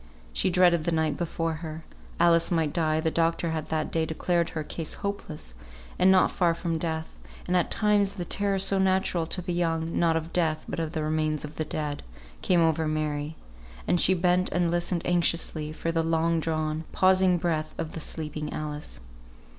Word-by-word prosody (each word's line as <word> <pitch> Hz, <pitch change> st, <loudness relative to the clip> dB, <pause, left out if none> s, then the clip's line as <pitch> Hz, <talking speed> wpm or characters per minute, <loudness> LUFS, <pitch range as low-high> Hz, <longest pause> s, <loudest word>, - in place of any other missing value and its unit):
She -, -, +1 dB
dreaded 175 Hz, -2 st, +4 dB
the 170 Hz, -, +1 dB
night 160 Hz, -2 st, +1 dB
before 165 Hz, -1 st, -2 dB
her. 160 Hz, -1 st, -7 dB, 0.3 s
Alice 170 Hz, -1 st, +4 dB
might 160 Hz, -4 st, +1 dB
die; 155 Hz, -2 st, +1 dB
the 160 Hz, 0 st, 0 dB
doctor 165 Hz, 0 st, +1 dB
had 155 Hz, -1 st, -3 dB
that 155 Hz, -1 st, -2 dB
day 165 Hz, -, +1 dB
declared 170 Hz, +1 st, 0 dB
her 155 Hz, -, -4 dB
case 160 Hz, +1 st, -4 dB
hopeless, 185 Hz, -, -5 dB, 0.5 s
and 185 Hz, -, +6 dB
not 185 Hz, -1 st, +4 dB
far 170 Hz, -2 st, +2 dB
from 165 Hz, -1 st, -2 dB
death; 160 Hz, -1 st, -4 dB, 0.3 s
and 180 Hz, -, 0 dB
at 180 Hz, -, +2 dB
times 205 Hz, -2 st, +2 dB
the 180 Hz, -3 st, -5 dB
terror, 200 Hz, +2 st, +1 dB
so 195 Hz, 0 st, +2 dB
natural 190 Hz, -3 st, +1 dB
to 180 Hz, +2 st, -3 dB
the 175 Hz, -, -2 dB
young, 165 Hz, -1 st, -1 dB
not 165 Hz, -1 st, +3 dB
of 165 Hz, +1 st, -5 dB
death, 160 Hz, -3 st, 0 dB
but -, -, -4 dB
of 160 Hz, 0 st, -3 dB
the 155 Hz, -2 st, -1 dB
remains 155 Hz, -1 st, 0 dB
of 150 Hz, -, -11 dB
the 155 Hz, -, -1 dB
dead, 150 Hz, -1 st, -3 dB, 0.4 s
came 175 Hz, -2 st, +3 dB
over 160 Hz, -1 st, +2 dB
Mary; 155 Hz, 0 st, -2 dB, 0.5 s
and 175 Hz, -, +3 dB
she 190 Hz, -, +6 dB
bent 180 Hz, +1 st, +2 dB
and 175 Hz, -1 st, +1 dB
listened 175 Hz, 0 st, -1 dB
anxiously 170 Hz, -3 st, 0 dB
for 165 Hz, +1 st, -3 dB
the 165 Hz, 0 st, +1 dB
long 165 Hz, 0 st, +1 dB
drawn, 155 Hz, -1 st, -2 dB
pausing 185 Hz, -1 st, +4 dB
breath 160 Hz, -2 st, -2 dB
of 160 Hz, -, -4 dB
the -, -, -6 dB
sleeping 150 Hz, -1 st, -5 dB
Alice. 150 Hz, 0 st, -5 dB
165 Hz, 190 wpm, -27 LUFS, 155-175 Hz, 0.5 s, and